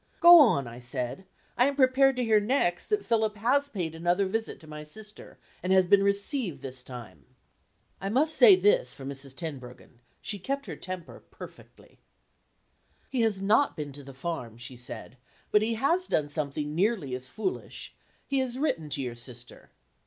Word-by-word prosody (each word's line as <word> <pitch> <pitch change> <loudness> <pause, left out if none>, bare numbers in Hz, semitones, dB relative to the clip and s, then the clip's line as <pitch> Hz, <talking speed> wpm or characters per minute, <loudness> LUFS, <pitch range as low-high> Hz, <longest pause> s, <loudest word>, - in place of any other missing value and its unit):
"Go 345 0 +10
on," 220 - +5
I 120 +1 -9
said; 125 +8 -3 0.3
"I 250 - +6
am 280 - -1
prepared 270 0 +4
to 250 - -1
hear 220 -2 +4
next 205 -5 0
that 420 -1 0
Philip 220 -2 +1
has 275 +7 +2
paid 175 - -4
another 175 +4 +1
visit 220 +3 -3
to 160 - -14
my 150 0 -8
sister, 210 +7 -10 0.2
and 180 - -2
has 190 -1 +5
been 200 +2 +5
received 200 - -1
this 130 -1 -6
time." 125 -2 -10 0.8
I 195 - -2
must 295 +8 +2
say 435 -6 +8
this 450 +6 +2
for 135 - -10
Mrs. 135 -1 -6
Tenbruggen: 130 -7 -8 0.2
she 205 - -3
kept 275 +8 -3
her 170 -7 -6
temper 185 +1 -8
perfectly. - - -14 1.1
"He 255 - 0
has 210 -4 0
not 220 +8 +3
been 150 -2 -5
to 145 - -10
the 135 -1 -12
farm," 130 -7 -5
she 125 +2 -8
said, 125 +1 -8 0.3
"but 210 - +5
he 225 +1 0
has 335 +10 +1
done 145 -1 0
something 150 0 -3
nearly 185 - 0
as 130 +1 -4
foolish. 220 - -5 0.3
He 275 -1 0
has 255 -1 -1
written 165 - -1
to 140 -1 0
your 125 -2 -4
sister." 120 0 -11
190 Hz, 180 wpm, -28 LUFS, -, 1.1 s, Go